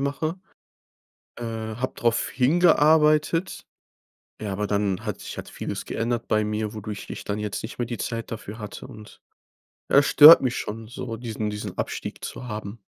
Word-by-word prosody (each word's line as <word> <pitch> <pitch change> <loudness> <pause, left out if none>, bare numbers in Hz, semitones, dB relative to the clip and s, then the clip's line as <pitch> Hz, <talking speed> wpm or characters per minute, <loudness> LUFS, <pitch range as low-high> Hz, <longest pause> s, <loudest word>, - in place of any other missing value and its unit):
mache, 155 +6 -2 1.0
äh, 120 - -6
hab 115 +2 -4
drauf 115 -1 0
hingearbeitet. 155 +3 +3 0.8
Ja, 105 -2 -3
aber 105 +2 -2
dann 100 -2 -1
hat - - -4
sich - - -8
hat - - -7
vieles - - -5
geändert 115 0 -2
bei 110 0 +2
mir, 105 0 -2
wodurch 105 -1 -7
ich - - -6
dann 105 +1 -3
jetzt 105 -2 -4
nicht 110 - -7
mehr 120 - 0
die 120 0 -5
Zeit 115 +2 -4
dafür 110 0 -7
hatte 105 -1 -8
und 105 -1 -13 0.7
ja, 140 - +7
stört 150 +3 +10
mich 130 -2 -1
schon 110 +1 -5
so, 120 -1 -6
diesen 110 -2 -3
diesen 105 -2 -6
Abstieg - - -5
zu 125 - -7
haben. 105 0 -6
115 Hz, 165 wpm, -24 LUFS, 105-130 Hz, 1.0 s, stört